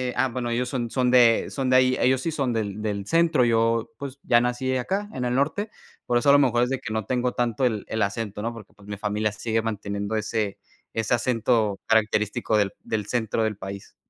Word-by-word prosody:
Ah, 130 +2 +2
bueno, 120 -1 -3
ellos 125 +1 -1
son 120 -3 -2
son 125 -2 +1
de 120 -3 +5
son 135 -2 -2
de - - +5
ahí, 130 0 +4
ellos 130 0 +3
sí 165 - -2
son 135 -6 -1
del 105 -2 -3
del 100 -2 -3
centro. 165 -5 +3
Yo, 115 -1 +2
pues 140 -1 -7
ya 120 - +4
nací 125 +2 -1
acá 195 +10 -2
en 125 -1 -3
el 120 - 0
norte. 155 - 0 0.4
Por 120 - +2
eso 130 - +2
a - - +8
lo 145 - +7
mejor 120 -4 +3
es 125 - 0
de 135 -1 -1
que 110 - -6
no 110 -3 -2
tengo 125 -1 0
tanto 120 +1 0
el 110 -4 0
el 110 - -2
acento, 105 0 -3
¿no? 115 +1 -2
Porque, 110 -3 -12
pues 105 0 -18
mi 105 - -4
familia 105 +1 -1
sigue 115 +1 -1
manteniendo 100 -1 -3
ese 110 -2 -2 0.3
ese 110 +1 -1
acento 115 -4 +1
característico 105 -1 +1
del 100 -2 +1
del 105 -3 -3
centro 115 -2 -1
del 110 -2 -1
país. 100 0 -8
115 Hz, 225 wpm, -25 LUFS, 105-130 Hz, 0.4 s, a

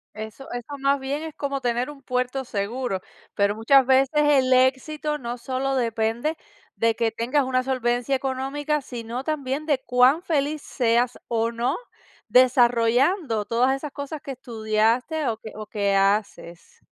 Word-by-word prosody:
Eso 220 +5 -8
eso, 245 +4 -6
más 275 0 +2
bien, 275 +3 -3
es 320 -1 -7
como 275 -2 -3
tener 245 +2 -1
un 285 -2 -11
puerto 255 +1 -2
seguro, 205 -2 -3 0.3
pero 200 0 +2
muchas 260 +4 +5
veces 265 0 +4
el 285 -3 +4
éxito 290 +4 +2
no 240 -2 -5
solo 265 +2 -2
depende 235 +5 -1 0.4
de 230 -1 +1
que 230 -1 0
tengas 245 +6 0
una 255 0 0
solvencia 250 0 0
económica, 275 +3 -2
sino 240 0 -6
también 290 -1 -2
de 290 -4 +1
cuán 250 +6 +4
feliz 300 -3 -1
seas 240 -2 0
o 230 0 0
no 240 +6 -1 0.5
desarrollando 245 - +3
todas 250 +3 +2
esas 285 +2 -6
cosas 285 +2 -6
que 275 - -7
estudiaste 235 +5 0
o 225 -2 -1
que 220 - -10
o 215 0 -7
que 200 -2 0
haces. 195 -4 -1
255 Hz, 150 wpm, -24 LUFS, 230-275 Hz, 0.5 s, muchas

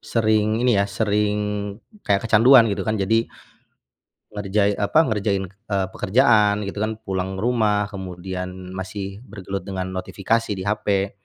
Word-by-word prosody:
sering 110 -1 +1
ini 125 - +4
ya, 100 - 0
sering 105 -1 0 0.6
kayak 100 - 0
kecanduan 115 +3 +7
gitu - - -3
kan. 110 0 0
Jadi 110 +4 +1 1.0
ngerjai 105 0 0
apa, 100 +9 +3
ngerjain, 105 -6 0
eee, 100 -1 -3
pekerjaan 105 -2 +3
gitu 100 +1 -5
kan 110 +1 -1
pulang 95 -1 -3
ke 95 - -5
rumah, 105 -4 +1
kemudian 90 -1 -6
masih 95 +1 -6
bergelut 100 -1 -6
dengan 95 -1 -4
notifikasi 105 +4 -1
di 95 - -5
HP. 100 -1 0
100 Hz, 140 wpm, -22 LUFS, 95-110 Hz, 1.0 s, kecanduan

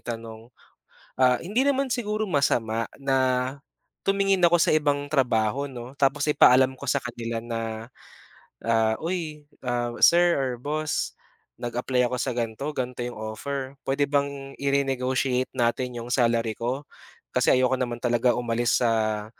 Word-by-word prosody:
itanong. 115 0 -7 0.7
Ah, 125 -1 +4
hindi 225 +10 0
naman 275 -1 +1
siguro 215 -4 -1
masama 115 -6 +1
na, 130 -1 0 0.5
tumingin 195 -1 +2
ako 175 - +3
sa - - +3
ibang 145 -2 +1
trabaho 125 -1 +1
'no 130 +1 -9
tapos 140 +2 +2
ipaalam 130 -2 +5
ko 140 - -8
sa - - +1
kanila 115 -1 -4
na, 115 0 -5 0.8
ah, 110 -1 +2
uy 160 -4 -4 0.6
sir 175 0 +6
or 135 -4 0
boss, 150 +4 -2 0.5
nag-apply 125 +1 0
ako 125 - -2
sa 125 - -1
ganito 115 +2 -3
ganito 125 -2 -3
'yong 120 - -6 0.2
offer 140 0 -5
puwede 140 +1 0
bang 140 -1 -2
i-renegotiate 130 -2 0
natin 125 0 0
'yong 120 - -8
salary 115 -3 +1
ko 125 +5 -2 0.5
kasi - - +3
ayoko 130 0 +2
naman 120 -2 -2
talaga 120 0 +2
umalis 120 0 +1
sa 110 -2 +1
130 Hz, 135 wpm, -25 LUFS, 120-140 Hz, 0.8 s, sir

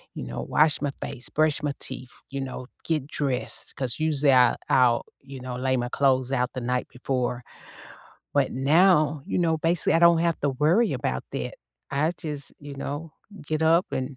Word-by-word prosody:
you - - -5
know, 65 +1 -5
wash 155 -1 +2
my 145 -1 -1
face, 125 - -2
brush 155 -1 +1
my 145 -1 -1
teeth, 130 -1 -5 0.2
you 135 0 -4
know, 130 -1 -6 0.2
get 155 -4 -1
dressed, 140 -4 -1
'cause, 130 0 -2
usually, 150 -3 +3
I 125 -2 +5
I'll, 125 -2 +3 0.2
you 135 -1 -10
know, 125 -1 -5
lay 130 0 0
my 120 0 -2
clothes 130 -1 +1
out 125 -1 0
the 130 - -4
night 125 +1 -1
before, 125 -1 -3 0.9
but - - +2
now, 150 +1 +3
you - - -1
know, 165 -2 +1
basically, 165 +2 +2
I - - +5
don't 170 -1 +6
have 170 -1 0
to 145 - +1
worry 160 - +2
about 65 - -2
that. - - -4 0.4
I 155 +5 +1
just, 150 -4 -4
you 145 -1 -9
know, 145 +3 -5 0.3
get 155 0 -1
up 165 +3 +4
and 130 +1 -3
140 Hz, 185 wpm, -25 LUFS, 130-155 Hz, 0.9 s, don't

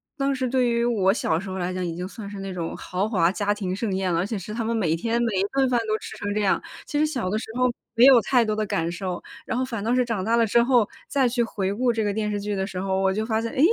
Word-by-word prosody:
当 275 -1 0
时 260 -1 -1
对 250 -1 +2
于 235 0 +1
我 200 -6 +3
小 165 -7 0
时 195 - -7
候 190 - -4
来 180 0 -2
讲 185 - -2
已 165 -1 -3
经 180 +1 -4
算 205 0 -8
是 205 - -8
那 195 -1 -5
种 170 -2 -4
豪 190 +4 -2
华 175 -5 +3
家 205 0 -1
庭 195 -3 -2
盛 200 -1 -2
宴 190 -2 0
了， 165 - +1
而 175 - 0
且 215 -1 -3
是 205 +3 -7
他 230 - -2
们 230 +1 -1
每 165 -7 +1
天 230 +7 -1
每 230 - 0
一 - - +2
顿 270 -1 +3
饭 240 - +3
都 215 - +1
吃 - - -9
成 205 0 -3
这 210 - +1
样。 200 - +2 0.2
其 295 - -2
实 305 - +4
小 250 -11 -2
的 215 - 0
时 - - -6
候 250 -1 +3 0.2
没 235 - +7
有 260 -4 +8
太 245 0 +3
多 215 - 0
的 215 0 -1
感 165 -4 -1
受， 180 0 -4 0.2
然 255 -2 -2
后 260 - +1
反 230 -5 -4
倒 235 +3 +1
是 250 - +3
长 225 -6 -2
大 225 +3 +2
了 230 - +4
之 235 +3 +4
后， 240 -4 +3 0.2
再 270 -3 +3
去 240 0 +1
回 200 -3 -2
顾 245 +3 +1
这 225 - 0
个 205 - 0
电 210 0 -1
视 205 - -1
剧 205 0 -2
的 190 0 -1
时 185 -2 -5
候， 190 0 0
我 190 0 +2
就 215 +2 -1
发 220 -1 0
现， 230 0 -3
哎， - - -5
215 Hz, 345 characters per minute, -24 LUFS, 190-235 Hz, 0.2 s, 有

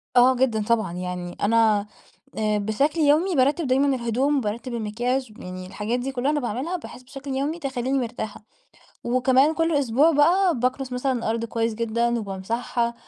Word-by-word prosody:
آه، 255 +1 +6
جدًا، 235 -4 +1
طبعًا. 220 -6 0
يعني 180 0 -5
أنا، 215 -1 +3 0.5
آآ، 215 -1 +1
بشكل 275 +10 0
يومي 315 +5 +3
بارتب 280 +3 +2
دايمًا 270 +1 +3
الهدوم، 255 +4 0
بارتب 235 +4 -4
المكياج، 235 +2 -2
يعني 185 -4 -8
الحاجات 215 +5 -2
دي 270 +2 -3
كلها 265 +3 0
أنا 295 - 0
باعملها، 260 - -3
بحيث 255 -6 -11
بشكل 275 +1 -8
يومي 285 +5 -2
تخليني 265 -1 -2
مرتاحة. 225 -3 -5 0.6
وكمان 260 +5 +3
كل 325 -1 +1
أسبوع 280 +4 +3
بقى 335 +1 +3
باكنس 255 +1 -1
مثلًا 260 +2 0
الأرض 230 -1 -2
كويس 230 -1 -1
جدًا 235 +1 0
وبامسحها، 230 +4 -2
245 Hz, 155 wpm, -24 LUFS, 220-275 Hz, 0.6 s, آه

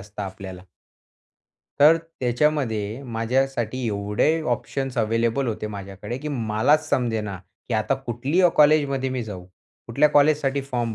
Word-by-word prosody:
असतं 105 +1 -8
आपल्याला. 95 -1 -8 1.2
तर 155 +3 +8
त्याच्यामध्ये 130 -7 -1
माझ्यासाठी 125 +1 -1
एवढे 105 +10 0
ऑप्शन्स 135 -2 -5
अवेलेबल 115 +4 +1
होते 110 -1 -3
माझ्याकडे 100 +3 -7
की 150 - -5
मलाच 135 +4 +1
समजेना. 110 -8 -1 0.3
की 115 - -1
आता 110 +5 +1
कुठल्या 135 +8 +1
कॉलेजमध्ये 145 -3 +4
मी 130 -1 -2
जाऊ. 95 -4 -8 0.4
कुठल्या 140 +6 +3
कॉलेजसाठी 145 -1 +3
फॉर्म 120 -4 -3
125 Hz, 120 wpm, -23 LUFS, 110-140 Hz, 1.2 s, तर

